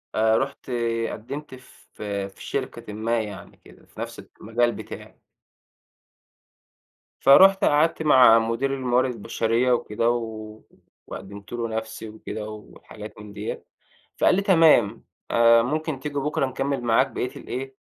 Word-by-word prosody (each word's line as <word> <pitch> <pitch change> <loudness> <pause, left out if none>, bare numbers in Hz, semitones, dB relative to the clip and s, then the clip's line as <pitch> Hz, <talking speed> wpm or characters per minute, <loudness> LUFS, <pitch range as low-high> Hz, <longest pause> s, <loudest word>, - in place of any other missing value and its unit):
آآ 110 0 +3
رُحت 135 -1 -4 0.4
قدّمت 130 +5 -7
ف 125 - -19 0.3
في - - -12
شركةٍ 105 - -5
ما 115 +2 -1
يعني 105 -3 -9
كده، - - -19
في - - -17
نفس - - -6 0.2
المجال 120 +2 +1
بتاعي. - - -10 2.0
فرُحت 195 +8 +6
قعدت 160 +3 +2
مع 125 -6 +7
مدير 115 +5 -1
الموارد 130 -1 +1
البشرية 115 +3 0
وكده، 115 -1 0
و 110 -2 -4 0.5
وقدّمت 100 +3 -10
له 120 -1 -2
نفسي 110 0 -5
وكده، 110 0 -7
وحاجات 105 0 -11
من 105 -1 -11
ديّة، - - -6 0.5
فقال - - +4
لي 195 - +1
تمام 160 - +4 0.3
آآ 115 0 +6
ممكن 155 +2 -2
تيجي 145 +1 -6
بُكرة 140 -1 0
نِكمِّل 135 0 -2
معاك 115 -1 +3
بقيّة 125 - -4
الإيه، 135 +2 -6
120 Hz, 130 wpm, -24 LUFS, 110-135 Hz, 2.0 s, مع